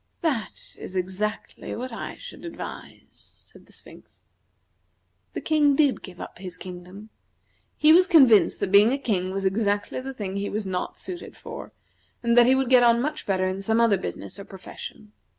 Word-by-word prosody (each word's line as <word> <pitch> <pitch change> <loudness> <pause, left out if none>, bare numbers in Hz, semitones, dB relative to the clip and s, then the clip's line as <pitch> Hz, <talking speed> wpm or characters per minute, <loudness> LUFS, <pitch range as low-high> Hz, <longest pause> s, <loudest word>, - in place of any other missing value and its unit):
"That 270 - -3
is 185 - -8
exactly 190 +4 -3
what 255 +2 -5
I - - -6
should - - -11
advise," 340 - -10
said - - -19
the - - -21
Sphinx. - - -15 1.1
The - - -4
King 295 -3 +3
did 285 -2 +2
give 180 -2 -11
up - - -9
his 180 -2 -8
kingdom. 185 +4 -10 0.7
He 310 +1 +6
was 365 +2 +6
convinced 260 - +5
that 185 - -1
being 205 +3 +7
a 270 - +1
King 195 -9 -1
was 195 +1 -3
exactly 205 +2 0
the 265 +1 -7
thing 200 -4 -4
he 200 0 -2
was 210 0 -3
not 185 -1 -3
suited 360 -1 -8
for, - - -9 0.5
and 235 0 +2
that 240 0 +7
he 260 - +5
would 265 -1 0
get 250 -1 +7
on 235 -1 +5
much 300 +4 -3
better 185 -1 +1
in 190 +1 -3
some 220 +3 +1
other 225 -5 +4
business 195 - -6
or - - -6
profession. 200 +2 -10
215 Hz, 185 wpm, -25 LUFS, 190-265 Hz, 1.1 s, being